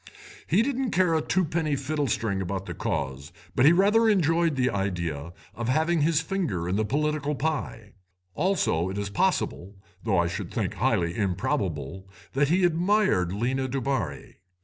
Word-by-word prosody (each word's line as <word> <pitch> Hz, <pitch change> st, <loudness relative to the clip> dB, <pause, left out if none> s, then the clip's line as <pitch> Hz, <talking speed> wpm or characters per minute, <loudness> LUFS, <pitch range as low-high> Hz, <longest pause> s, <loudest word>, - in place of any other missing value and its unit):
He 195 Hz, +7 st, +3 dB
didn't 265 Hz, -1 st, -1 dB
care 180 Hz, -4 st, +2 dB
a 160 Hz, -, +2 dB
twopenny 160 Hz, -4 st, 0 dB
fiddlestring 130 Hz, -8 st, -1 dB
about 95 Hz, +1 st, -3 dB
the -, -, -5 dB
Cause, 70 Hz, +2 st, -3 dB, 0.2 s
but 125 Hz, -, +5 dB
he -, -, +8 dB
rather 210 Hz, +5 st, +4 dB
enjoyed 165 Hz, -5 st, +2 dB
the 125 Hz, -2 st, +1 dB
idea 85 Hz, -6 st, -3 dB, 0.2 s
of 115 Hz, +1 st, -4 dB
having 160 Hz, +4 st, +2 dB
his 160 Hz, +1 st, +3 dB
finger 160 Hz, -, -2 dB
in 90 Hz, -, 0 dB
the 110 Hz, -, +1 dB
political 150 Hz, +5 st, -1 dB
pie. 135 Hz, -8 st, -3 dB, 0.4 s
Also 150 Hz, -, +1 dB
it 95 Hz, -, -5 dB
is 100 Hz, -1 st, -3 dB
possible, 100 Hz, -1 st, -1 dB, 0.3 s
though 105 Hz, -5 st, +1 dB
I 85 Hz, -, +3 dB
should 85 Hz, -, -5 dB
think -, -, -2 dB
highly 85 Hz, +1 st, 0 dB
improbable, 95 Hz, -, -2 dB, 0.2 s
that 140 Hz, +1 st, +2 dB
he 180 Hz, +3 st, +3 dB
admired 175 Hz, -, +2 dB
Lena 130 Hz, +6 st, -1 dB
Dubarri. 125 Hz, -, -3 dB
130 Hz, 155 wpm, -26 LUFS, -, 0.4 s, he